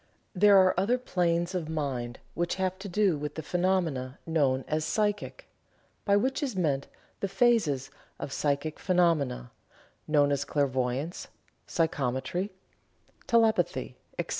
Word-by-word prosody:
There 200 +1 +6
are 185 -1 +6
other 225 +6 +2
planes 175 -6 0
of 170 -4 -3
mind 130 -6 -3 0.2
which 175 0 -1
have 190 -1 -2
to 200 +1 -7
do 185 -4 +2
with 150 0 -5
the 160 - -5
phenomena 170 -8 0
known 140 -5 +1
as 155 0 0
"psychic," 210 - -1 0.6
by 200 - +4
which 265 +8 0
is 265 -7 -2
meant 145 -7 0 0.3
the 195 - -1
phases 195 - +2 0.3
of 135 - -6
psychic 145 +2 -1
phenomena 165 - +1 0.6
known 145 -2 +3
as 140 0 +1
clairvoyance, 140 +2 -1 0.4
psychometry, 160 +3 -1 0.8
telepathy, 225 -2 +2 0.2
etc. - - -3
165 Hz, 130 wpm, -28 LUFS, 140-190 Hz, 0.8 s, There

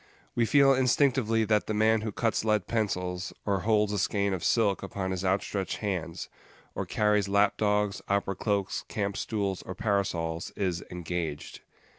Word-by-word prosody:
We 115 -1 +1
feel 140 +3 +6
instinctively 125 -3 +2
that 105 -1 +1
the 110 - -1
man 110 +1 +3
who 110 0 -3
cuts 110 0 0
lead 105 -4 +1
pencils, 90 -5 -2
or 100 -2 +1
holds 105 0 +2
a 105 - 0
skein 100 +1 +1
of 90 - -3
silk 105 -4 +2
upon 95 -1 -4
his 95 0 -3
outstretched 95 0 -1
hands, 90 -5 -3 0.5
or - - -4
carries 105 -2 +2
lap 100 +1 +3
dogs, 105 -1 0
opera 100 0 +1
cloaks, 100 -1 -1
camp 100 -2 -2
stools, 100 -2 -2
or 95 - -7
parasols, 85 -6 -1
is 90 -4 -1
"engaged." 85 -4 -4
100 Hz, 160 wpm, -28 LUFS, 95-110 Hz, 0.5 s, feel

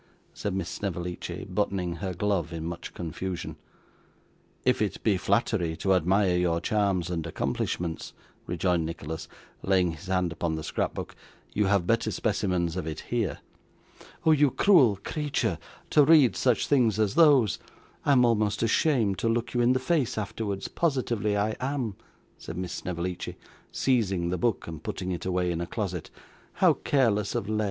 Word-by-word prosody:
said 100 -2 -3
Miss 95 - -2
Snevellicci, 90 -3 -4
buttoning 95 -3 -1
her 90 +1 -4
glove 90 -3 0
in 80 -1 -5
much 85 0 -6
confusion. 90 +1 -5 1.1
'If - - +3
it - - -2
be 105 - +3
flattery 90 -3 +1
to 95 +3 +2
admire 95 +1 +3
your 85 -2 +1
charms 95 -2 0
and 85 -3 -2
accomplishments,' 85 -2 -3 0.4
rejoined 90 -1 +1
Nicholas, 80 0 -5 0.3
laying 95 -3 +2
his 80 +4 -10
hand 90 -2 +1
upon 85 -1 -2
the 80 - -5
scrapbook, - - -3 0.4
'you 105 -2 +2
have 100 -3 +2
better 115 +4 +1
specimens 90 -6 0
of 90 -4 -3
it 80 -1 -4
here.' 110 -11 -1 0.8
'Oh 160 - +6
you 145 -2 +5
cruel 130 - +5
creature, 150 -2 -1 0.3
to 150 - +6
read 145 -4 +6
such 125 -3 +2
things 120 -7 +3
as 105 -2 +1
those! 145 - +5 0.4
I'm 135 -4 +5
almost 105 -2 +1
ashamed 115 - +2
to 115 - +1
look 115 +1 -1
you 120 - +2
in 120 +1 +4
the - - +2
face 130 -3 0
afterwards, 105 -1 -3
positively 120 -9 0
I 105 +2 0
am,' 130 -6 -2 0.4
said 80 - -7
Miss 90 -1 -4
Snevellicci, 90 -1 -4 0.3
seizing 100 -9 +1
the 90 - -1
book 120 +1 0
and 80 -2 -7
putting 90 +2 -4
it 90 +1 -4
away 90 -1 0
in 85 0 -2
a 85 - -3
closet. 95 -7 -4 0.4
'How - - +4
careless 110 -7 +1
of 100 - -2
Led! 110 0 -1
100 Hz, 160 wpm, -27 LUFS, 90-115 Hz, 1.1 s, Oh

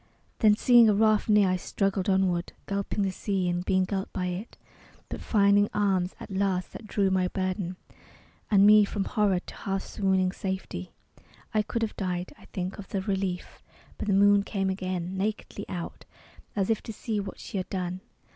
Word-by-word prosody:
Then 215 -2 +6
seeing 235 0 +6
a 210 - +3
raft 215 +1 +3
near, 210 -2 +5
I 185 - +1
struggled 195 +1 -1
onward, 185 -2 +1
Gulping 200 +1 -2
the 195 - 0
sea 190 -1 -1
and 175 0 -1
being 185 0 +2
gulped 195 0 -3
by 185 - -2
it, 185 +6 -6 0.5
But - - -6
finding 205 -1 +4
arms 190 -3 +1
at - - -9
last 190 -1 -1
that 215 - -9
drew 195 -2 +1
my 185 -1 +2
burden 185 -1 -2 0.7
And 200 -2 +6
me 210 0 +8
from 200 0 -2
horror 200 -4 +1
to - - -11
half 195 -1 -2
swooning 190 -2 +1
safety. 190 - -5 0.6
I 215 - +3
could 230 +2 -2
have 220 - -2
died, 180 0 -3
I - - -16
think, 185 -1 -5
of 195 - -8
the 195 - -2
relief. 190 -2 -3 0.4
But - - -4
the 200 - +3
moon 205 0 +6
came 195 -1 -1
again, 185 -1 -3
nakedly 205 0 -3
out, 175 -2 -6 0.5
As 200 +1 +1
if 220 - 0
to - - -7
see 215 0 -3
what 200 - -5
she - - -6
had 185 0 -3
done. 185 -1 -3
195 Hz, 185 wpm, -27 LUFS, 185-205 Hz, 0.7 s, me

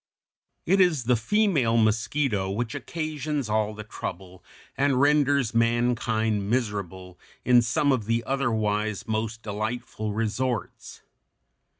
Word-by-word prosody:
] - - -54
It 195 - +5
is 165 -8 +3
the 125 +1 +3
female 140 - +2
mosquito 110 -1 +1
which 110 +3 -3
occasions 150 -5 -3
all 110 0 0
the 110 - -7
trouble 90 -3 -8 0.3
and 140 -2 +2
renders 140 -4 +3
mankind 115 -3 +1
miserable 95 -6 -3 0.3
in 125 -1 +6
some 125 +5 +1
of 120 -6 0
the 115 +2 0
otherwise 110 -5 -1
most 110 +1 -3
delightful 110 +1 -4
resorts. 115 +1 -3
115 Hz, 115 wpm, -26 LUFS, 105-130 Hz, 0.3 s, in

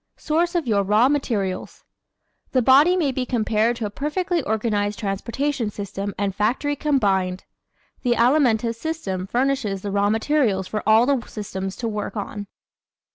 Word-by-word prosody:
Source 340 +3 0
of 340 -4 +1
Your 210 -4 +2
Raw 210 +6 +3
Materials 215 -10 -2 0.7
¶ - - -42
The 255 -2 +3
body 290 +9 +6
may 300 -6 +1
be 260 0 -2
compared 230 -1 +1
to 230 -2 -4
a 205 - -4
perfectly 340 - -1
organized 210 -3 -1
transportation 230 +5 -2
system 200 0 -5
and 200 -1 -1
factory 245 +9 0
combined. 195 -11 0 0.6
The 245 -2 +2
Alimentive 235 -2 +3
system 230 - -4
furnishes 245 -5 -1
the 200 - -3
raw 200 +1 +2
materials 220 -4 +1
for 215 - -3
all 220 +2 +6
the 270 -3 +1
systems 195 -2 -5
to 235 - -4
work 210 0 -4
on. 205 0 -5
225 Hz, 155 wpm, -22 LUFS, 205-275 Hz, 0.7 s, body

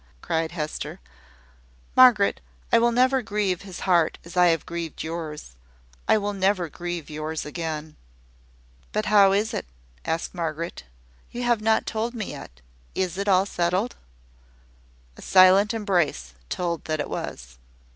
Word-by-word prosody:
cried 165 0 -1
Hester. 155 -3 -4 1.0
"Margaret, 240 -6 +6 0.3
I 230 - +6
will 235 +1 +3
never 255 +2 +3
grieve 205 -5 -1
his 190 -3 -9
heart 175 -4 +2
as 170 - -11
I 180 0 +6
have 165 -3 +1
grieved 170 -2 -5
yours. 160 - -6 0.6
I - - +5
will 205 0 -2
never 190 -3 +1
grieve 175 0 -5
yours 155 +1 -4
again." 155 -1 -5 1.0
"But 215 +1 0
how 200 -2 +6
is 210 +3 +1
it?" - - -4 0.4
asked 165 +1 -2
Margaret. 165 - -4 0.4
"You 245 - -5
have 240 -3 +2
not 220 0 +2
told 230 +2 -2
me 215 -4 -4
yet. - - -11 0.3
Is 185 -1 -1
it 200 +2 -3
all 190 -1 +4
settled?" 185 +5 -1 1.2
A - - -12
silent 190 +2 +6
embrace 175 - 0 0.2
told 170 -3 -2
that 155 -1 -2
it - - -2
was. - - -6
180 Hz, 145 wpm, -25 LUFS, 160-210 Hz, 1.2 s, Margaret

